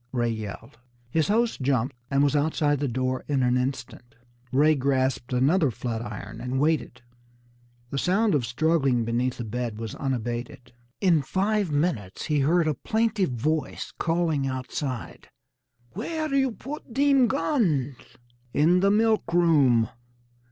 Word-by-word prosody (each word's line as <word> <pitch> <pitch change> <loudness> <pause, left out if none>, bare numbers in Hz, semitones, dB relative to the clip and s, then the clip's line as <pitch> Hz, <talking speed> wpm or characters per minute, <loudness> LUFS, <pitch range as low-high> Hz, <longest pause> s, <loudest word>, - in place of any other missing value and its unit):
Ray 120 -2 0
yelled. 110 +1 -7 0.3
His 160 +2 +1
host 225 -3 +1
jumped, 130 0 0
and 140 0 +2
was 145 0 +2
outside 145 -1 +1
the 145 - 0
door 130 +1 -2
in 140 -3 +1
an 125 0 +2
instant. 125 -1 -4 0.4
Ray 150 +4 +4
grasped 130 -3 0
another 140 +6 +3
flat 115 -1 -4
iron 105 0 -7
and 125 +2 -2
waited. 145 -5 0 0.9
The 140 - -1
sound 200 +6 +2
of 145 -4 +2
struggling 135 -1 +1
beneath 120 +2 -1
the 120 - -4
bed 115 0 -4
was 110 -1 -5
unabated. 120 0 -4 0.3
In 175 -6 +4
five 195 +4 0
minutes 145 - -1
he 150 -2 +1
heard 160 +4 +3
a 155 - +2
plaintive 215 - 0
voice 155 +6 -2
calling 165 -5 0
outside: 130 -1 -5 0.6
"Where 310 - -3
you 265 -3 +2
put 265 -1 -8
dem 275 -2 +4
goons?" 175 - 0 0.6
"In 170 +5 +4
the 195 +2 +3
milk 215 -3 +2
room." 145 -10 +4
140 Hz, 140 wpm, -26 LUFS, 125-175 Hz, 0.9 s, Ray